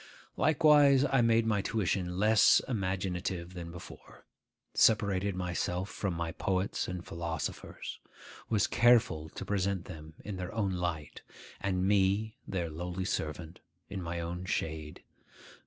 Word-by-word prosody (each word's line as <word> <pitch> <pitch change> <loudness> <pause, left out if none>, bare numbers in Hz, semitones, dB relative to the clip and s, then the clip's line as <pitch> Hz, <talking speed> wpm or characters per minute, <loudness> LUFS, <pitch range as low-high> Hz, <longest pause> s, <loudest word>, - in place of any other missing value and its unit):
Likewise 145 -3 +5
I 135 -1 +3
made 115 -1 +3
my 105 -3 +1
tuition 95 -4 -1
less 105 +2 +6
imaginative 95 -5 -2
than 85 -2 -7
before; 90 +1 -12 0.5
separated 100 -3 +3
myself 90 +1 -2
from 95 -4 -2
my 85 -1 -2
poets 95 +3 -1
and 90 -1 -5
philosophers; 85 -2 -5 0.5
was 105 -4 +3
careful 110 -10 +3
to 95 - -7
present 100 -2 -1
them 80 0 -10
in 100 -2 -5
their 90 +3 -5
own 100 -4 0
light, 85 -4 -3 0.4
and 95 -1 0
me, 100 +2 +2
their 85 -4 -2
lowly 90 +3 -4
servant, 80 0 -4 0.3
in 95 - -5
my 85 0 -4
own 85 +2 -4
shade. 80 -6 -3
95 Hz, 130 wpm, -31 LUFS, 85-105 Hz, 0.5 s, less